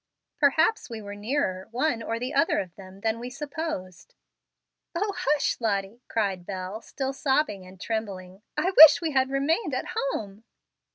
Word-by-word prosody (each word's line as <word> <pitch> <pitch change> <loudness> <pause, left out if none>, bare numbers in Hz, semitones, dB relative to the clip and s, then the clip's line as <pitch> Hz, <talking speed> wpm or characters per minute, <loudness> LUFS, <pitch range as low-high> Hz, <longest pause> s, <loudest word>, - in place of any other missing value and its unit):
Perhaps 315 +8 +3
we 230 -2 -6
were 205 -1 -8
nearer 205 -3 -2
one 245 0 0
or 225 0 -2
the 250 +3 -4
other 330 - +3
of 180 -3 -3
them 190 0 -13
than 225 +1 0
we 245 +1 -5
supposed." 275 - -6 0.8
"O, 400 +3 0
hush, 295 0 +1
Lottie!" 205 +1 -1
cried 195 -5 -1
Bel, 190 +3 -5
still 270 +2 -4
sobbing 265 -9 0
and 185 0 -14
trembling; 195 -4 -4 0.2
"I 370 - +1
wish 310 -1 +11
we 330 -2 -2
had 265 -1 +2
remained 290 - 0
at - - -3 0.2
home." 205 -1 -6
230 Hz, 160 wpm, -26 LUFS, 195-285 Hz, 0.8 s, wish